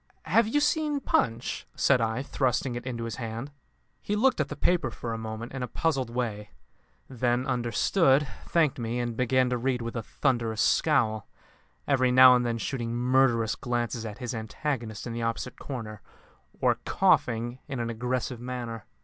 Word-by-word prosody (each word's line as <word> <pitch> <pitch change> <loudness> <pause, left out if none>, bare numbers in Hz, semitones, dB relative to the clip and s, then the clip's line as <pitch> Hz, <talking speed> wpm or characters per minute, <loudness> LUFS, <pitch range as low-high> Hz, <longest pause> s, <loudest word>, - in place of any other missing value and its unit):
"Have 230 -1 +3
you 290 +7 +2
seen 295 -1 +1
Punch?" 115 - -1
said 135 -3 +3
I, 115 +3 -1
thrusting 130 -2 0
it 120 +1 -6
into 120 -2 -3
his 115 -2 -5
hand. 115 +3 -5 0.5
He 210 - -2
looked 245 -4 +3
at 145 - -2
the 150 - -5
paper 170 -3 +1
for 115 0 -5
a - - -3
moment 110 +1 -6
in 135 - -4
a 125 - -2
puzzled 135 -6 -1
way; 115 -4 -3 0.6
then 125 0 0
understood, 135 - +2 0.2
thanked 155 -6 +2
me, 120 +1 -2
and 120 -1 -2
began 130 +1 +2
to 125 - 0
read 125 -1 -1
with 115 +1 -5
a 115 - -1
thunderous 115 -1 -1
scowl, 115 -11 +2 0.6
every 130 -3 +3
now 130 0 +9
and 125 - +2
then 120 -1 -1
shooting 120 +1 -3
murderous 120 -2 +3
glances 120 -1 -2
at 110 -2 -6
his 125 -2 -4
antagonist 110 0 -4
in 120 - -4
the 115 - -4
opposite 115 +2 -3
corner, 110 -6 -6 0.6
or - - +2
coughing 120 +2 +1
in 135 -4 -4
an 115 0 -2
aggressive 125 +1 -2
manner. 120 -3 -5
120 Hz, 175 wpm, -27 LUFS, 115-130 Hz, 0.6 s, now